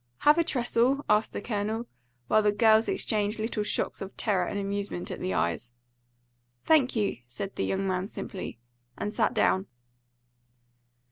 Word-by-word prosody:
"Have 300 +3 +6
a - - +4
trestle?" 255 -1 +1
asked 210 0 +3
the - - -5
Colonel, 220 +1 -2 0.4
while 215 - +4
the 210 -1 +3
girls 220 +1 +4
exchanged 210 0 +1
little 220 0 -2
shocks 210 - -2
of 195 0 -7
terror 190 -5 +1
and - - -3
amusement 200 -2 -3
at - - -5
the 185 - -2
eyes. 85 +8 -1 0.9
"Thank 290 -6 +4
you," 210 -3 0
said 160 +11 -5
the - - -1
young 195 0 -1
man 185 0 -1
simply, 190 - -6 0.4
and 210 +1 -3
sat - - +1
down. 190 +2 +2
210 Hz, 155 wpm, -28 LUFS, 195-230 Hz, 0.9 s, Have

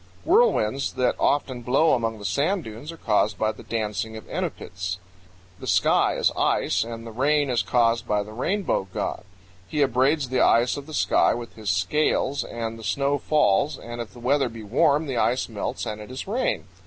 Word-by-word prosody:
Whirlwinds 320 - +3
that 125 - +1
often 130 -3 +1
blow 135 +7 +3
among 115 -2 0
the 105 - -9
sand 155 - 0
dunes 115 +7 -8
are 165 - -11
caused 105 -5 +1
by 110 0 +1
the - - -12
dancing 110 0 -3
of 110 - -11
Enupits. 90 0 -4 0.6
The - - -8
sky - - +3
is - - +2
ice, - - +1
and 115 0 -7
the 115 - -7
rain 140 +4 +1
is 120 - +2
caused 115 -1 +1
by 105 -1 +1
the 105 - -11
Rainbow 160 - -1
God; - - -3 0.4
he 150 -2 +1
abraids 135 +2 +2
the 130 - +1
ice 120 +2 +4
of 145 0 -7
the 155 - -6
sky - - +3
with 120 -1 -7
his 110 -2 -5
scales 130 +8 +1
and 115 -1 -5
the - - -10
snow 140 +9 0
falls, 145 -1 +2
and 120 0 -7
if 115 - -7
the 120 - -12
weather 135 +2 +1
be 115 -1 -9
warm 145 +8 +2
the 135 -4 -3
ice 125 +2 +1
melts 110 -3 -4
and 105 0 -5
it 105 - -10
is 130 +6 -6
rain. 240 +6 -1
120 Hz, 195 wpm, -24 LUFS, 110-145 Hz, 0.6 s, ice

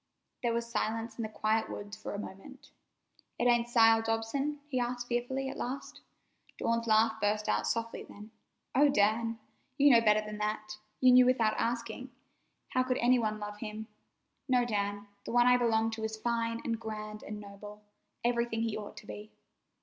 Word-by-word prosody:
There 240 -2 +1
was 235 0 -1
silence 225 0 -2
in - - 0
the 220 - -3
quiet 215 +1 0
woods 205 +1 -6
for 215 - -6
a - - -3
moment. 205 +7 -10 0.7
"It - - 0
ain't 240 -1 +4
Sile 225 -2 +5
Dobson?" 225 +7 -1
he 260 -4 -1
asked 245 0 -2
fearfully 245 +3 -2
at - - -5
last. 260 +3 -5 0.6
Dawn's 230 0 0
laugh 220 0 +3
burst 210 +1 +1
out - - +1
softly 230 0 -2
then. 210 +2 -12 0.4
"Oh, 285 +3 +5
Dan! 225 0 +2 0.4
You 285 0 +6
know 235 -2 +7
better 215 -1 +4
than 210 0 -6
that. 215 0 -3 0.2
You 255 -1 +7
knew 250 0 +7
without 230 -4 +3
asking. 235 +2 -2 0.6
How 255 - +1
could 255 0 0
any 245 +1 +4
one 215 -2 -1
love 210 0 -6
him? 215 0 -6 0.6
No, 250 -1 +4
Dan; 205 -2 -2 0.2
the - - -6
one 240 0 +5
I 250 0 +6
belong 225 -2 +2
to 225 0 -5
is 220 0 -3
fine 230 0 -1
and 230 -1 -2
grand 215 -1 -6
and 210 0 -7
noble—everything 210 +3 -4
he 225 -2 -1
ought 210 -1 -7
to - - -10
be." 210 +1 -9
225 Hz, 180 wpm, -31 LUFS, 215-240 Hz, 0.7 s, know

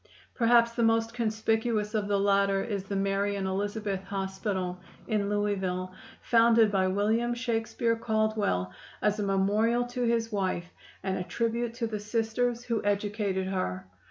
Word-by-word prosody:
Perhaps 235 -1 +4
the 235 - -2
most 225 0 +2
conspicuous 220 -1 0
of 210 -2 0
the 200 -1 +1
latter 195 -1 +2
is 200 -4 -3
the 200 - -4
"Mary 195 +1 0
and 195 -1 -2
Elizabeth 200 0 -2
Hospital," 190 -2 -3 0.3
in 210 -3 0
Louisville, 190 -3 -1 0.3
founded 230 -2 +5
by 190 -2 +2
William 220 +5 +1
Shakespeare 230 -1 0
Caldwell 215 - 0 0.3
as 210 0 +2
a - - 0
memorial 210 +5 +2
to 245 +1 -5
his 230 -1 +1
wife 185 -3 -2 0.3
and 190 -1 -1
a - - -2
tribute 230 +3 -2
to 235 -1 -2
the 215 -2 -3
Sisters 230 +3 -1
who 230 -3 -1
educated 205 -1 0
her. 185 - -2
210 Hz, 150 wpm, -28 LUFS, 195-230 Hz, 0.3 s, founded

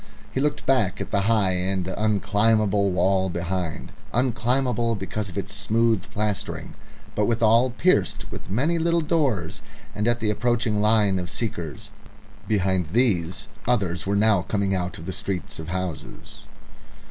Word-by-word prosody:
He - - -2
looked 145 +2 0
back 110 -7 +2
at - - -5
the 100 - +2
high 105 -5 +3
and 90 0 -1
unclimbable 105 0 +2
wall 95 +1 +2
behind 85 -2 -3 0.2
unclimbable 120 -1 +1
because 100 +1 -4
of 90 - -9
its 100 0 -4
smooth 110 0 +1
plastering, 105 -1 -3 0.4
but 105 - +1
withal 115 +2 +4
pierced 175 +9 +1
with - - -8
many 145 - +1
little 170 +1 +2
doors, 140 - 0 0.3
and 105 +2 -1
at 120 0 +2
the 110 -2 +1
approaching 115 -2 +1
line 105 -3 +3
of 90 -1 -5
seekers. 85 - -5 0.6
Behind 95 -4 +1
these 100 -2 +1 0.2
others 95 -8 0
were 100 - +1
now 105 -2 +4
coming 100 +1 -1
out 90 -1 -2
of 80 - -9
the 95 - -4
street 90 -5 -4
of 80 - -6
houses. 85 -4 -6
105 Hz, 145 wpm, -24 LUFS, 95-115 Hz, 0.6 s, withal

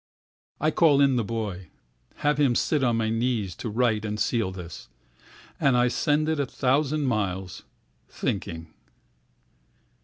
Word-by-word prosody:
I 155 +1 +2
call 150 -3 +4
in 140 -2 +4
the 120 - +1
boy, 100 -5 -4 0.6
Have 150 0 +2
him 135 -5 +3
sit 150 +2 +1
on 120 -2 +2
his 110 -1 0
knees 115 -5 -1
to 115 - -4
write 110 -1 +1
and 105 0 -3
seal 110 -2 0
this, 90 -3 -9 0.7
And 135 -3 +3
I 125 0 +3
send 150 +4 +1
it 160 -1 0
a 140 - +1
thousand 145 +4 +1
miles, 95 -6 -2 0.4
thinking. 85 -5 -4
120 Hz, 145 wpm, -26 LUFS, 100-140 Hz, 0.7 s, call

